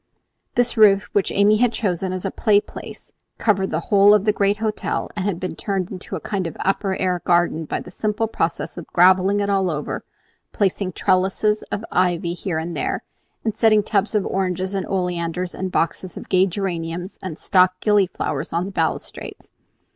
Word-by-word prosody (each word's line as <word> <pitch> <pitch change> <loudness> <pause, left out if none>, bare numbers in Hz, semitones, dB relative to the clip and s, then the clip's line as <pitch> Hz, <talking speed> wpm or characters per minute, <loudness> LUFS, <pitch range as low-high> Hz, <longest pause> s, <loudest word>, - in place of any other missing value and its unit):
This 245 -1 +1
roof, 205 -2 +6
which 200 - +2
Amy 205 +2 +4
had 245 +1 +3
chosen 190 -5 -1
as 185 -1 -3
a - - -1
playplace, 205 -3 -1 0.3
covered 195 -3 +1
the - - -1
whole 200 +1 +7
of 205 -1 +1
the 210 - +3
great 200 0 +1
hotel, 215 0 -2
and 195 -2 -2
had 195 -4 -1
been 185 - -4
turned 195 -3 -2
into 190 0 -6
a 165 - -5
sort 190 -4 -1
of 165 - -8
upper 195 0 0
air 180 -2 -1
garden 170 -2 +2
by - - -3
the - - -11
simple 215 +3 -1
process 170 -3 -2
of 170 - -10
gravelling 185 +3 +4
it 200 - 0
all 190 -2 +2
over, 150 -2 -4 0.5
placing 195 -2 0
trellises 195 +4 +1
of 215 - -3
ivy 175 -2 +1
here 175 -2 -3
and 165 +2 -4
there, - - -2 0.4
and 220 -2 0
setting 220 -2 +4
tubs 210 +1 0
of 205 - +2
oranges 185 0 -1
and 195 -1 -2
oleanders 180 -1 -2
and 190 0 -4
boxes 175 +2 -1
of - - -9
gay 185 0 +4
geraniums 175 -1 -4
and 185 -5 -6
stock 185 -1 +3
gillyflowers 205 -4 0
on 170 +2 0
the 195 - -6
balustrades. - - -4
190 Hz, 185 wpm, -21 LUFS, 180-205 Hz, 0.5 s, whole